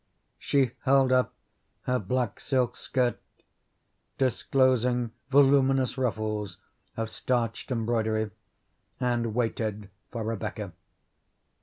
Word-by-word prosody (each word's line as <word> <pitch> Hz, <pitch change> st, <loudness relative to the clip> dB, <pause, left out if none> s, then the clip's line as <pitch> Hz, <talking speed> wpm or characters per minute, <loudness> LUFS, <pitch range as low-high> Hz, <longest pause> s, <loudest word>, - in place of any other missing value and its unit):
She 135 Hz, -4 st, +2 dB
held 135 Hz, -1 st, +4 dB
up 130 Hz, 0 st, +3 dB, 0.5 s
her 125 Hz, 0 st, +1 dB
black 120 Hz, +2 st, -1 dB
silk 125 Hz, -3 st, 0 dB
skirt, 125 Hz, -2 st, 0 dB, 1.0 s
disclosing 125 Hz, -2 st, +2 dB, 0.2 s
voluminous 135 Hz, -2 st, +4 dB
ruffles 110 Hz, -6 st, -2 dB, 0.4 s
of 115 Hz, 0 st, -1 dB
starched 115 Hz, +1 st, -2 dB
embroidery, 110 Hz, -3 st, 0 dB, 0.7 s
and 120 Hz, -3 st, 0 dB
waited 110 Hz, -4 st, -2 dB, 0.2 s
for 115 Hz, -2 st, -3 dB
Rebecca. 110 Hz, -2 st, -4 dB
120 Hz, 90 wpm, -28 LUFS, 110-130 Hz, 1.0 s, held